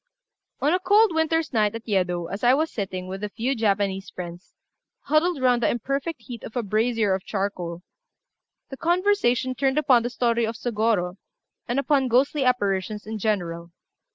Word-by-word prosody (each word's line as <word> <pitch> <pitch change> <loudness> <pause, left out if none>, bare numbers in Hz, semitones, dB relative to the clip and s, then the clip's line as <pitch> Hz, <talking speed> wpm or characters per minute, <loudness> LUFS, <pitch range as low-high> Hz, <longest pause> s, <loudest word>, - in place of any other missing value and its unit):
One 300 +5 +2
cold 405 +1 +4
winter's 320 -1 0
night 215 -2 +2
at 230 +1 -8
Yedo, 180 -4 0
as 195 +6 -6
I 245 +2 +6
was 315 +3 0
sitting, 190 -3 -4
with 190 +2 -6
a 210 - -2
few 235 +6 -1
Japanese 200 -3 0
friends, 175 0 -9 0.5
huddled 310 +2 +1
round 245 -1 +3
the 220 - +3
imperfect 275 +3 -3
heat 235 0 -8
of 220 - -9
a 245 - 0
brazier 215 0 +1
of 190 0 -2
charcoal, 180 -4 -3 0.9
the 270 - -6
conversation 340 - +1
turned 270 +2 0
upon 265 -6 +4
the 240 - -2
story 235 -1 +1
of 225 - -4
Sôgorô 215 -6 0 0.5
and 240 +2 -1
upon 275 -1 +2
ghostly 270 +4 +2
apparitions 210 -4 0
in 220 0 -5
general. 170 -5 -2
230 Hz, 165 wpm, -24 LUFS, 195-270 Hz, 0.9 s, I